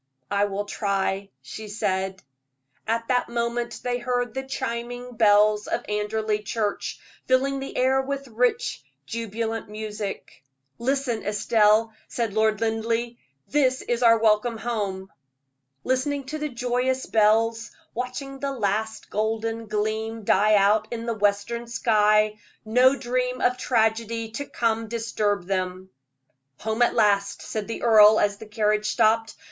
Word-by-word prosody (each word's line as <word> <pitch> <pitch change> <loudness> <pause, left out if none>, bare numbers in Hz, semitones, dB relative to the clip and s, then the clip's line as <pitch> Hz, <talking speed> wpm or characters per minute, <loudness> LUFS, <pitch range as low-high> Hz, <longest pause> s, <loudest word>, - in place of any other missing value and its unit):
"I 200 0 +3
will 205 0 -3
try," 195 -1 -1
she 215 +11 -8
said. 190 -2 -2 0.6
At 230 +1 -1
that 250 -1 +1
moment 235 0 -2
they 245 0 -1
heard 245 -1 -1
the 265 - -2
chiming 245 -2 -5
bells 210 -1 +4
of - - -2
Anderley 210 +1 -1
Church, 210 0 -3 0.3
filling 270 +1 +2
the 270 - -6
air 265 +1 +3
with 275 0 -4
rich, 245 - 0 0.2
jubilant 225 -1 -4
music. 210 -7 -6 0.4
"Listen, 255 -2 -1
Estelle," 215 +1 +3
said 230 -4 -2
Lord 220 0 +2
Linleigh; 230 +1 0 0.4
"that 260 -3 +2
is 240 0 0
our 230 -1 +6
welcome 225 +1 +2
home." 200 -5 -3 0.7
Listening 275 +2 0
to 305 +4 -6
the 300 0 -2
joyous 250 +1 -1
bells, 225 +1 +2 0.2
watching 270 +3 -5
the 275 0 -2
last 220 -1 -2
golden 225 +1 -2
gleam 220 +1 -2
die 210 +2 +4
out 210 +2 +3
in 230 -1 -5
the 235 - -1
western 210 +3 0
sky, 215 -2 +2 0.3
no 250 +5 +5
dream 250 -1 -2
of 250 - +2
tragedy 225 -2 0
to 285 +6 -4
come 225 -1 -1
disturbed 210 -4 -1
them. 185 -1 -3 0.7
"Home 220 +2 -2
at 240 - +3
last," 200 -2 +2
said 215 -2 -4
the 230 - -5
earl, 215 -2 +7
as 205 0 +1
the 220 - -11
carriage 210 0 +1
stopped. 225 0 +2
225 Hz, 135 wpm, -25 LUFS, 210-245 Hz, 0.7 s, earl